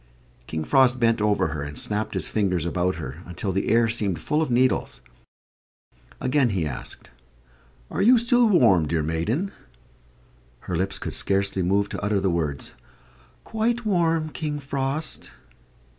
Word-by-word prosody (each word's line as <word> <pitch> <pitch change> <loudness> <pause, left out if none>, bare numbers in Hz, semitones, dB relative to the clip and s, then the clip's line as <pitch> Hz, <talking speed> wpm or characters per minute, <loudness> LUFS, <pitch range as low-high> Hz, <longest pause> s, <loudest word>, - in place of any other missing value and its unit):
King 80 -1 -3
Frost 130 - +3
bent 115 -2 +2
over 105 -6 +2
her 80 -2 -4
and 75 +1 -6
snapped 105 +1 -2
his - - -1
fingers 90 -6 0
about 90 +1 0
her, 65 +6 -7
until 90 +3 -3
the 95 +1 -1
air 115 0 +4
seemed 105 -6 -1
full 150 +1 -1
of 155 - -1
needles. 125 +1 +1 1.2
Again 130 0 +2
he 95 -6 -1
asked, 70 -3 -5 0.8
"Are - - -1
you 245 +5 +6
still 240 0 +3
warm, 110 - +4
dear 80 0 0
maiden?" 105 - -1 1.1
Her 90 - -4
lips 95 +3 -1
could - - -5
scarcely 100 -1 +1
move 100 +3 +1
to - - -5
utter 105 -1 +1
the 95 -1 +1
words, 75 -5 -3 0.7
"Quite 230 +2 -1
warm, 165 -5 +1
King 150 -1 -4
Frost." 140 +2 -4
105 Hz, 150 wpm, -24 LUFS, 90-145 Hz, 1.2 s, you